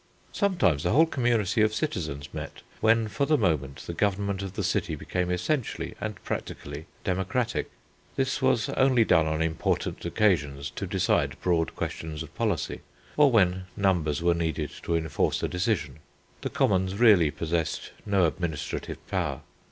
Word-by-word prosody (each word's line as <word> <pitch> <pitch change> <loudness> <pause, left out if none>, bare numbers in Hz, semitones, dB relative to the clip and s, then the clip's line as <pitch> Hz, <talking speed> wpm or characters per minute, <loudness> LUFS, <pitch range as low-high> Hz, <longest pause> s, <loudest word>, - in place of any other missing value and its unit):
Sometimes 175 - +2
the - - 0
whole 160 +5 +6
community 120 - +1
of 110 0 +3
citizens 75 - -3
met, - - -7 0.2
when 115 0 +3
for 140 +6 -1
the 155 - +4
moment 70 - 0
the 85 - -4
government 100 +1 0
of 95 -2 -5
the - - -3
city - - 0
became 90 -1 -2
essentially 105 - -1
and 110 0 -3
practically 75 +3 -5 0.2
democratic. 100 +6 -1 0.5
This - - 0
was - - +2
only 130 -3 +4
done 80 -5 +4
on 80 +1 0
important 80 -1 -1
occasions 80 -8 +1
to - - -5
decide - - +1
broad 85 -2 0
questions 80 -1 -4
of 80 -1 -13
policy, 105 -10 -1 0.3
or 150 -1 +6
when 95 -6 +3
numbers 85 -6 +1
were 85 0 +4
needed 80 -3 -2
to 85 - -1
enforce 80 -3 0
a - - +2
decision. 90 - -1 0.4
The - - -2
commons 95 -1 +1
really 100 -8 +6
possessed 80 +2 -2
no 100 -3 +3
administrative 80 -1 -3
power. - - -2
90 Hz, 150 wpm, -27 LUFS, 80-110 Hz, 0.5 s, whole